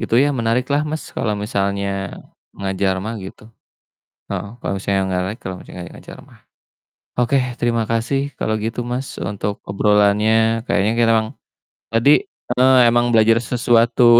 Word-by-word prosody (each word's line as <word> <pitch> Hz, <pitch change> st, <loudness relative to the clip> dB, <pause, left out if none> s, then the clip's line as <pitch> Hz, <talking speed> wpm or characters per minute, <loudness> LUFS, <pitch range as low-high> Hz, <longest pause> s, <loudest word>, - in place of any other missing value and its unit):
Gitu -, -, -1 dB
ya 145 Hz, +3 st, +4 dB
menarik 120 Hz, 0 st, 0 dB
lah 145 Hz, +1 st, +2 dB
Mas 155 Hz, +1 st, -4 dB
kalo 105 Hz, -2 st, -1 dB
misalnya, 100 Hz, -1 st, -2 dB, 0.4 s
ngajar 95 Hz, -1 st, 0 dB
mah 110 Hz, +2 st, -4 dB
gitu, 105 Hz, +4 st, -11 dB, 0.8 s
heeh. 100 Hz, 0 st, -3 dB
Kalo -, -, -3 dB
misalnya 100 Hz, 0 st, 0 dB
nggak 90 Hz, -1 st, 0 dB
layak 105 Hz, +5 st, -6 dB
kalo 95 Hz, -, -5 dB
lagi -, -, -14 dB, 0.2 s
ngajar -, -, -12 dB
mah. -, -, -20 dB, 0.8 s
Oke, 125 Hz, +3 st, +2 dB, 0.2 s
terima 115 Hz, -1 st, +1 dB
kasih 115 Hz, +4 st, 0 dB, 0.2 s
kalo 110 Hz, -, -1 dB
gitu 115 Hz, +2 st, -3 dB
Mas 125 Hz, +2 st, -4 dB
untuk 100 Hz, +2 st, -3 dB
obrolannya, 105 Hz, +2 st, +3 dB
kayaknya 100 Hz, +2 st, +2 dB
kita 115 Hz, 0 st, +2 dB
emang 110 Hz, 0 st, -1 dB, 0.6 s
tadi, 120 Hz, +6 st, +4 dB, 0.3 s
eee, 130 Hz, +1 st, +5 dB
emang 120 Hz, 0 st, +2 dB
belajar 115 Hz, 0 st, +5 dB
sesuatu. 120 Hz, 0 st, +4 dB
115 Hz, 150 wpm, -20 LUFS, 100-120 Hz, 0.8 s, eee